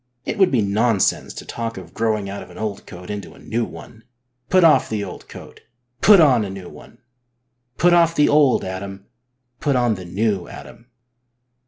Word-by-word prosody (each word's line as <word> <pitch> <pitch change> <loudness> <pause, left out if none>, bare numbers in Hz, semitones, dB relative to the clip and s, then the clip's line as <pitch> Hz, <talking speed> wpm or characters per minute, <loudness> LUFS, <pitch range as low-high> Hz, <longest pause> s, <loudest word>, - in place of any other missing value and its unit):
It 220 - -4
would 190 -2 +5
be 120 -5 +1
nonsense 105 +1 +1
to - - -8
talk 115 -2 -5
of 85 -3 -11
growing 110 -3 -1
out 100 +1 -6
of - - -12
an 90 - -14
old 105 -1 -5
coat 90 +2 -9
into 100 -3 -7
a - - -17
new 115 +1 -2
one. 115 0 -11 0.5
Put 185 -1 +4
off 160 -2 +5
the 105 -2 -2
old - - -9
coat, - - -12 0.4
put 205 -2 +7
on 130 -8 +5
a 100 - -5
new 95 -2 -8
one! - - -15 0.8
Put 175 0 +4
off 170 -1 +4
the 150 - +4
old 145 -3 +3
Adam, 95 +1 -7 0.5
put 140 -2 0
on 120 -2 +2
the 95 -3 -8
new 100 0 -1
Adam 115 - -12
110 Hz, 190 wpm, -21 LUFS, 100-135 Hz, 0.8 s, put